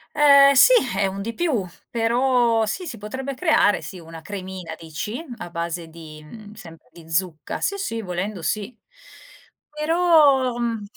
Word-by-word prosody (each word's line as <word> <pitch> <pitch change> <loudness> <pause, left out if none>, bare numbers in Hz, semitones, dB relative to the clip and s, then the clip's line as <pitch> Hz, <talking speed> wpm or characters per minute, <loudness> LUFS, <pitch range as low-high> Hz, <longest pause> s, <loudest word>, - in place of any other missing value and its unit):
Ehm, 280 -1 +7
sì, 385 - +7 0.3
è 195 - +2
un 195 +1 -5
di 230 +3 -5
più, 280 - -1 0.2
però 235 -1 +1
sì 360 - -4
si 255 -9 -7
potrebbe 260 +6 -6
creare, 310 - +2
sì, 185 - -9
una 165 0 -11
cremina 185 -3 -7
dici, 170 - -6
a 175 - -8
base 170 0 -4
di 160 -2 -12
mhmm, 210 +6 -12
sempre 165 -5 -14
di 165 -2 -15
zucca. 165 -2 -3
Sì, 400 - -1
sì, 230 -12 -4
volendo 180 0 -4
sì. 215 +6 -3 1.0
Però, 300 -5 +3
mhmm 230 -3 -2
215 Hz, 155 wpm, -22 LUFS, 175-265 Hz, 1.0 s, Ehm